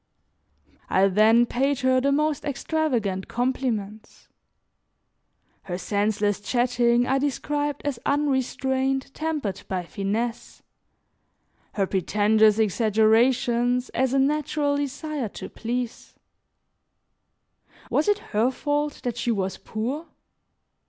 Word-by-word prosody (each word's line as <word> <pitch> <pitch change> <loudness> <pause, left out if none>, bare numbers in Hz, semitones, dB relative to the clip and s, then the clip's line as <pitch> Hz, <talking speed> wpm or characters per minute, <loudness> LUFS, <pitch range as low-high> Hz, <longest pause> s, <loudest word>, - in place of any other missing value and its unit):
I 195 +1 +4
then 220 +5 +5
paid 275 +3 0
her 255 0 +3
the 280 +2 +2
most 300 +1 +1
extravagant 260 -10 -1
compliments; 225 -4 -3 1.4
her 180 -2 -4
senseless 205 +1 0
chatting 240 +1 +2
I 265 +1 +1
described 290 +1 -2
as 280 -5 -2
unrestraint 270 -1 0
tempered 290 -12 -3
by 185 -2 -2
finesse, 210 +6 -4 1.1
her 200 -2 +1
pretentious 210 +3 +3
exaggerations 235 +4 +2
as 260 0 0
a - - +3
natural 290 +1 +1
desire 285 -2 -3
to - - -7
please; 240 +1 -4 1.8
was 300 - +2
it 415 -1 +3 0.2
her 220 +4 +3
fault 290 +2 -2
that 245 -2 -3
she 240 - -2
was 190 -4 -1
poor? 260 +10 -4
245 Hz, 100 wpm, -25 LUFS, 215-280 Hz, 1.8 s, then